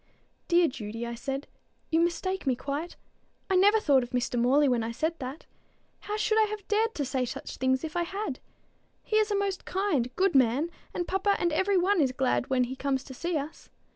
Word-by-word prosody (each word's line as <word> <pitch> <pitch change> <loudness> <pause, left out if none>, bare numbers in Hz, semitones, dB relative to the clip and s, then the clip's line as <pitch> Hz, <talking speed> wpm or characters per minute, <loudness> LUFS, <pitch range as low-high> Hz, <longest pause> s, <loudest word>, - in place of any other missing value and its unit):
"Dear 345 -1 +5
Judy," 230 -3 -5
I 235 - -4
said, 270 +4 -4 0.5
"you 325 - +3
mistake 345 +1 -1
me 260 - +3
quite. 280 +6 -4 0.6
I - - +4
never 410 +4 +5
thought 280 -10 +4
of 245 - -5
Mr. 250 0 -1
Morley 275 +5 +4
when 245 -3 +2
I 225 +1 -3
said 315 +8 -1
that. 265 +3 -6 0.5
How 420 +1 -4
should 430 +1 +2
I 430 - +3
have 420 -2 -6
dared 445 +2 +1
to 285 - -1
say 260 0 -1
such 245 - -6
things 260 0 +1
if 320 +1 -5
I 350 - +1
had? 385 -4 -3 0.6
He 430 - 0
is 430 0 +3
a 415 - +1
most 395 -1 -1
kind, 365 -11 0
good 385 0 +2
man, 270 +5 +3 0.2
and 350 - -3
papa 385 +1 +1
and 345 -2 0
every 380 +4 +2
one 370 0 +3
is 265 -3 +2
glad 255 -1 0
when 260 -1 +3
he 250 +2 -4
comes 270 -1 -1
to 265 - -10
see 340 +5 -2
us. 290 +2 -7
310 Hz, 215 wpm, -28 LUFS, 260-385 Hz, 0.6 s, Dear